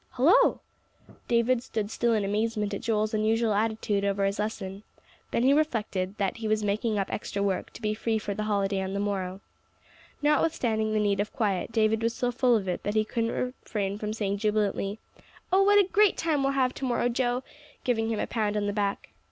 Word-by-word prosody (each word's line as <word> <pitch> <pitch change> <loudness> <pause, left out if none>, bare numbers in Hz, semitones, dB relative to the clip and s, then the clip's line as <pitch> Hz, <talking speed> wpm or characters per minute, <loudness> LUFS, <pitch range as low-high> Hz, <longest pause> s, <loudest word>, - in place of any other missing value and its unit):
"Hullo!" 370 - +5 0.7
David 235 +1 +2
stood 220 -4 -4
still 235 0 +1
in 210 -2 0
amazement 210 0 -1
at 200 - -3
Joel's 215 -1 0
unusual 220 +1 +2
attitude 215 -1 0
over 200 0 +1
his 195 +1 -1
lesson. 200 -2 -4 0.5
Then 235 - 0
he 270 +2 +5
reflected 215 -10 -1
that 195 0 -1
he 225 -1 -4
was 215 0 +1
making 210 +2 0
up 195 - -2
extra 200 -1 -3
work, 195 -2 -1
to 230 - -12
be 215 0 +1
free 220 +1 -1
for 210 -1 -3
the 215 +2 -3
holiday 200 -2 0
on 190 0 -3
the - - -1
morrow. 195 -2 -2 0.8
Notwithstanding 240 -8 +1
the 215 - +2
need 200 -2 +1
of 205 +1 -1
quiet, 205 -5 -1
David 220 0 +2
was 230 0 0
so 245 -1 0
full 245 0 +3
of 200 -4 -1
it 180 - -2
that 205 +1 -3
he 215 0 +3
couldn't 230 +1 -1 0.3
refrain 200 -2 -3
from 210 0 -3
saying 200 -2 -2
jubilantly, 210 -1 0 0.6
"Oh, 385 - +6
what 410 +1 +5
a 400 -3 +5
great 415 0 +3
time 315 -4 +1
we'll 275 0 +1
have 260 -2 +1
to 270 - -5
morrow, 240 -1 +1
Joe!" 245 +1 0 0.4
giving 225 -3 0
him 220 -2 -1
a - - 0
pound 210 -2 -1
on 205 - 0
the 205 - -1
back. 200 -1 -2
215 Hz, 210 wpm, -27 LUFS, 205-235 Hz, 0.8 s, Oh